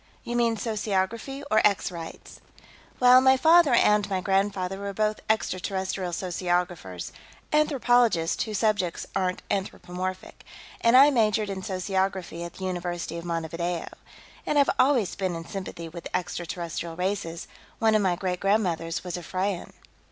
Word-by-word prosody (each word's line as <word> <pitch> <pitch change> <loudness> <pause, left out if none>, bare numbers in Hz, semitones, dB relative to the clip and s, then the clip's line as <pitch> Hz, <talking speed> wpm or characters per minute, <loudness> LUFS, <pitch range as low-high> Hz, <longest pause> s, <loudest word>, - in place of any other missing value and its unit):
"You 240 - -4
mean 235 -1 +2
sociography, 220 +5 -2
or 215 - +5
Ex 200 -3 +2
Rights? 165 -2 -9 0.6
Well, 250 0 +7
my 265 0 +5
father 320 -2 +6
and 210 -2 +3
my 190 -1 0
grandfather 195 0 0
were 200 0 -4
both 215 0 0
extraterrestrial 190 -3 -1
sociographers 175 - -2 0.4
anthropologists 245 - +3
whose 215 -2 -3
subjects 205 -5 0
aren't 185 -1 -1
anthropomorphic 185 -1 -4 0.4
and 235 +2 +6
I 280 +3 +8
majored 215 -4 +2
in 190 -1 -5
sociography 190 -2 -2
at 170 - -8
the 190 - -6
University 175 -2 -3
of 170 - -9
Montevideo. 170 +1 -3 0.5
And 300 - 0
I've 280 - +5
always 255 -7 +3
been 185 -3 -2
in 165 0 -6
sympathy 180 -3 -6
with 170 +1 -8
extraterrestrial 170 -2 -4
races; 180 -2 -3 0.3
one 220 -1 +3
of 215 - +4
my 185 -3 +2
great 180 0 -2
grandmothers 180 -5 0
was 180 -1 -4
a - - -6
Freyan." 185 +2 -3
190 Hz, 145 wpm, -26 LUFS, 175-215 Hz, 0.6 s, I